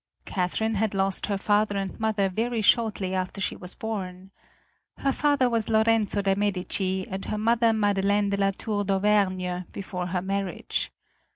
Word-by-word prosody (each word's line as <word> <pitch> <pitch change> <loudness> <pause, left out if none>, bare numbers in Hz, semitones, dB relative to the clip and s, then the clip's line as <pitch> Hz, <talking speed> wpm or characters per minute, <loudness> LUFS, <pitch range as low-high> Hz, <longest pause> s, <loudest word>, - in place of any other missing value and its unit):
Catherine 200 +4 -1
had 215 -1 0
lost 195 0 0
her 200 -1 0
father 205 0 +1
and 195 -1 -4
mother 215 -3 +1
very 225 +4 -1
shortly 205 -4 +2
after 185 +1 -2
she 190 - -1
was 180 0 -6
born. 190 -4 -5 0.7
Her 275 - +1
father 285 -2 +2
was 230 -2 0
Lorenzo 220 -2 +2
de' 195 0 +3
Medici, 190 -1 -1
and 190 0 -5
her 215 - -2
mother 230 +1 +3
Madeleine 205 -1 +2
de 200 - 0
la 195 0 +3
Tour 205 +1 -2
d'Auvergne 190 -2 +1
before 180 -2 -4
her 180 0 -2
marriage. 195 -2 -2
200 Hz, 160 wpm, -26 LUFS, 190-220 Hz, 0.7 s, de